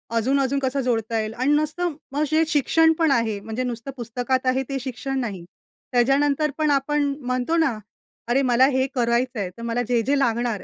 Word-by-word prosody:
अजून-अजून 270 +4 +1
कसा 270 +1 -1
जोडता 230 -3 -1
येईल 215 0 -3
अन् 290 +3 +3
नसतं 310 +2 -2 0.2
मग 295 +2 +1
जे 315 +1 +4
शिक्षण 320 +2 +3
पण 320 -3 +3
आहे 225 -5 +1
म्हणजे 225 +4 -4
नुसतं 240 +1 -5
पुस्तकात 245 +2 -2
आहे 260 +1 +2
ते 275 -1 -2
शिक्षण 265 +1 -4
नाही. 205 -8 -4 0.5
त्याच्यानंतर 280 +4 +2
पण 305 -1 +2
आपण 290 +1 +1 0.2
म्हणतो 255 +5 0
ना, 275 -9 +1 0.5
"अरे! 255 +3 +3
मला 255 -1 +4
हे 260 0 +1
करायचं 240 0 0
आहे. 185 -3 -2
तर 230 - -9
मला 235 +1 -1
जे 240 -2 +2
जे 280 +4 +1
लागणार 235 -4 0
255 Hz, 185 wpm, -23 LUFS, 235-280 Hz, 0.5 s, जे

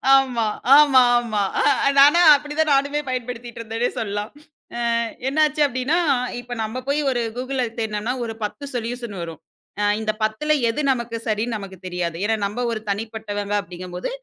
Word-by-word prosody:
ஆமா. 255 -4 +2 0.3
ஆமாமா. 245 -6 +4 0.5
அ - - +5
நானா 295 +5 +7
அப்படி 295 +1 -5
தான் 315 -2 +3
நானுமே 280 +2 +1
பயன்படுத்திட்டு 245 -2 -5
இருந்தேனே 230 +2 -2
சொல்லாம். 205 0 -3 0.5
அ - - -3 0.5
என்னாச்சு 300 +2 +2
அப்படின்னா, 260 +5 0 0.4
இப்போ 245 0 -7
நம்ம 220 +3 -4
போய் 285 +2 +1
ஒரு 245 -2 0 0.2
Google 260 +1 -2 0.2
தேடுனோனா 220 +1 -2
ஒரு 225 -1 -4
10 245 +7 -5
சொல்யூஷன் 235 -2 -4
வரும். 165 -2 -7 0.6
இந்த 220 -1 0
10ல 220 +8 0 0.2
எது 230 +6 -1
நமக்கு 235 -2 -3
சரின்னு 220 +2 -1
நமக்கு 195 -2 -9
தெரியாது. 175 -2 -3
ஏன்னா 220 +2 +1
நம்ப 205 +5 -3
ஒரு 225 - -2
தனிப்பட்டவங்க 205 -1 -4
அப்படிங்கும்போது 180 0 -7
235 Hz, 150 wpm, -22 LUFS, 210-265 Hz, 0.6 s, நானா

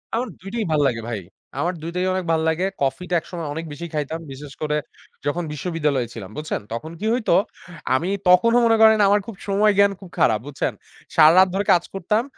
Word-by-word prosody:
আমার 245 +2 -1
২ 195 - -8
টিই 230 -2 -1
ভাল 155 - +2
লাগে 115 -3 -2
ভাই 115 -3 -3 0.4
আমার 175 +2 0
২ 165 - -5
টাই 180 - 0
অনেক 185 -1 -2
ভাল্লাগে। 160 +2 +1 0.2
কফিটা 180 +6 -1
একসময় 170 -1 -7
অনেক 160 +2 -5
বেশি 170 +4 -7
খাইতাম, 155 +1 -3
বিশেষ 140 +1 -9
করে 150 -1 0 0.5
যখন 170 +5 -1
বিশ্ববিদ্যালয়ে 150 -5 -1
ছিলাম, 100 -5 -8
বুঝছেন? 155 +1 -3
তখন 155 +8 -5
কি 215 - -4
হইতো? 225 -8 +2 0.6
আমি 170 +7 -1 0.2
তখনও 230 +7 +5
মনে 225 -1 +4
করেন 220 0 +7
আমার 205 +1 +4
খুব 225 - -7
সময় 205 +1 +3
জ্ঞান 200 0 +5
খুব 190 - -12
খারাপ 110 -2 +3
বুঝছেন? 145 - -2 0.4
সারারাত 165 +4 +7
ধরে 200 +1 -1
কাজ 175 -2 +2
করতাম। 195 +4 0
170 Hz, 195 wpm, -22 LUFS, 150-195 Hz, 0.6 s, করেন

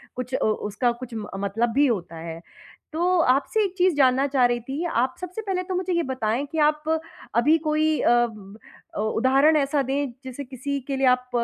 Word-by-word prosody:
कुछ 250 +1 -6
अ, - - 0
उसका 215 +3 0
कुछ 250 -2 -8
म 215 -2 -5
मतलब 205 +4 0
भी 280 +3 +4
होता 175 -8 -2
है। 165 0 -7 0.5
तो 355 +2 +2
आपसे 355 - +1
एक 385 -3 -2
चीज़ 365 -2 +3
जानना 265 -1 +4
चाह 265 -2 +3
रही 240 0 +1
थी, 270 +8 -5
आप 255 -5 0
सबसे 365 +4 -5
पहले 380 -3 -2
तो 370 0 -4
मुझे 365 0 -1
ये 340 -1 +1
बताएँ 255 0 -1
कि 320 - -4
आप 300 0 +2 0.5
अभी 295 +8 +4
कोई 310 0 +2
अ, - - +3 0.2
ब 210 -2 -13 0.4
अ, - - -2
उदाहरण 265 +8 +3
ऐसा 280 0 +1
दें, 270 0 -1
जैसे 260 +2 -7
किसी 275 +2 -4
के 275 - -2
लिए 265 0 +2
आप 250 0 +2
265 Hz, 205 wpm, -24 LUFS, 240-310 Hz, 0.5 s, भी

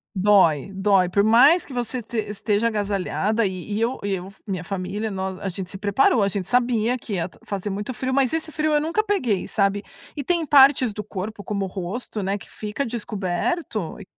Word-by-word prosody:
Dói 190 -5 +4
dói, 195 -1 +3
por 200 +3 +2
mais 255 - +6
que - - -14
você 245 0 -3
te 230 +1 -7
esteja 210 +1 0
agasalhada 210 +1 0
e 190 +2 -4
e 215 - -1
eu 240 +3 0
e 200 -1 -1
eu 180 0 -6
f 200 - -26
minha 185 -4 -3
família, 195 +4 -3
nós, 190 -1 -4
a 195 - -3
gente 185 0 -6
se 195 - -7
preparou, 205 +3 +3
a - - +3
gente 195 -2 -3
sabia 245 0 +2
que 230 - -7
ia 180 -1 -1 0.2
fazer 200 0 -3
muito 205 +5 -4
frio, 260 +3 -2
mas 270 -1 +2
esse 320 -1 -2
frio 305 0 0
eu 295 - +3
nunca 330 +8 0
peguei, 255 - 0
sabe, 200 0 +1 0.3
e 285 - -2
tem 335 +3 +1
partes 270 -5 +6
do 210 - -5
corpo, 205 +1 -6
como 200 -1 -2
o - - -4
rosto, 195 +4 -5
né, 195 +2 -1
que - - -14
fica 215 +6 -4
descoberto 210 - -3
e 200 - -10
210 Hz, 210 wpm, -23 LUFS, 195-245 Hz, 0.3 s, mais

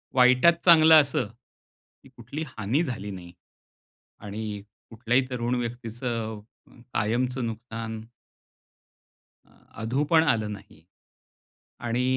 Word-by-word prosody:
वाईटात 125 +6 +6
चांगलं 160 -2 +8
असं, 135 -5 -1 0.8
की 135 - -17
कुठलीही 135 +6 -7
हानी 115 +11 0
झाली 105 -8 -5
नाही. 90 -2 -10 0.9
आणि 105 0 -6 0.3
कुठल्याही 120 +3 +1
तरुण 120 0 -1
व्यक्तीचं 115 -1 -4
अ, 110 +3 -23
कायमचं 125 +4 0
नुकसान 115 -1 -6 1.4
अ, - - -27 0.3
अधू 125 +6 0
पण 160 -1 +5
आलं 110 -2 -3
नाही 100 -5 -13 1.1
आणि 120 +2 0
120 Hz, 105 wpm, -26 LUFS, 110-130 Hz, 1.4 s, चांगलं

